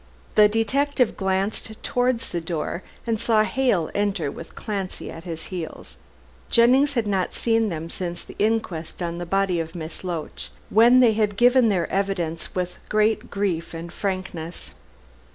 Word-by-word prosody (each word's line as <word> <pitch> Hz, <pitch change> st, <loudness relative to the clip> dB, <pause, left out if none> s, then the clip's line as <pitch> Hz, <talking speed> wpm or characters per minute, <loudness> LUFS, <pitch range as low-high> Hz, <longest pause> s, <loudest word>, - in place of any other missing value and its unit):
The 210 Hz, -1 st, +7 dB
detective 260 Hz, +4 st, +1 dB
glanced 195 Hz, +3 st, -1 dB
towards 245 Hz, -1 st, 0 dB
the 170 Hz, -, -3 dB
door 165 Hz, +1 st, -3 dB, 0.2 s
and 225 Hz, -2 st, 0 dB
saw 220 Hz, -1 st, +3 dB
Hale 215 Hz, -9 st, +1 dB
enter 200 Hz, -8 st, 0 dB
with 165 Hz, -, -10 dB
Clancy 195 Hz, -3 st, -4 dB
at 165 Hz, +2 st, -10 dB
his 165 Hz, -2 st, -5 dB
heels. 170 Hz, -3 st, -6 dB, 0.5 s
Jennings 260 Hz, +5 st, +5 dB
had 235 Hz, -4 st, 0 dB
not 195 Hz, -3 st, 0 dB
seen 225 Hz, -2 st, +2 dB
them 165 Hz, -2 st, -4 dB
since 175 Hz, 0 st, -4 dB
the -, -, -12 dB
inquest 195 Hz, -7 st, -1 dB
on 170 Hz, 0 st, -3 dB
the 175 Hz, -, -5 dB
body 195 Hz, -1 st, +1 dB
of 165 Hz, +1 st, -4 dB
Miss 160 Hz, 0 st, -6 dB
Loach, 170 Hz, -4 st, -5 dB, 0.2 s
when 240 Hz, +4 st, +7 dB
they 235 Hz, -3 st, +6 dB
had 210 Hz, -2 st, 0 dB
given 245 Hz, 0 st, +5 dB
their 180 Hz, -5 st, +1 dB
evidence 185 Hz, -5 st, -2 dB
with 180 Hz, -1 st, -3 dB
great 215 Hz, +1 st, +2 dB
grief 175 Hz, -5 st, -2 dB
and 170 Hz, +1 st, -7 dB
frankness. 185 Hz, -4 st, -4 dB
195 Hz, 155 wpm, -24 LUFS, 170-225 Hz, 0.5 s, The